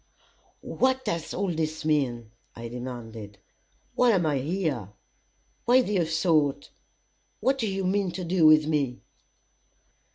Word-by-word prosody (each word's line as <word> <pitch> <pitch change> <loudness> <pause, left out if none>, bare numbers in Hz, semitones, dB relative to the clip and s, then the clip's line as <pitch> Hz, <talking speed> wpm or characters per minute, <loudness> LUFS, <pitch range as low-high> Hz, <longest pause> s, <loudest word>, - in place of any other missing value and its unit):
"What 260 0 0
does 170 -6 -3
all 195 -1 -1
this 155 0 -3
mean?" 125 -7 0 0.2
I 115 0 -7
demanded. 115 -4 -8 0.6
"Why 250 - +3
am 180 -4 +2
I 145 -3 +1
here? 145 - -2 0.8
Why 250 +2 +5
this 190 -7 0
assault? 155 -4 +1 0.7
What 270 +1 +1
do 225 - 0
you 195 0 -2
mean 195 0 +1
to 185 - -5
do 170 -2 +3
with 155 0 +6
me?" 145 -5 -1
155 Hz, 130 wpm, -26 LUFS, 130-190 Hz, 0.8 s, with